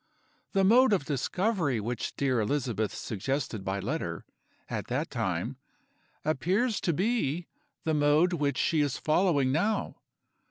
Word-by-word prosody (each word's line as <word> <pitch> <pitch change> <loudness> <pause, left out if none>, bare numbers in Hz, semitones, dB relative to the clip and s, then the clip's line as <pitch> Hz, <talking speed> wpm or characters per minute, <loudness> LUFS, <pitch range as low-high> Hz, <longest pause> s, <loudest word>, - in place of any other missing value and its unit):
The 195 -1 +3
mode 235 +4 +6
of 180 -8 +1
discovery 155 - 0
which 115 +2 -3
dear 130 -4 +1
Elizabeth 115 -3 -1
suggested 115 -1 -3
by 95 +1 -2
letter, - - -3 0.4
at - - -4
that - - -2
time, - - -2 0.7
appears 190 - +1
to 170 - +1
be 175 - 0 0.4
the 160 - 0
mode 150 +4 +3
which 145 -5 0
she 160 -2 +2
is 145 -3 0
following 155 -5 +2
now. 205 +9 0
150 Hz, 130 wpm, -29 LUFS, 130-185 Hz, 0.7 s, mode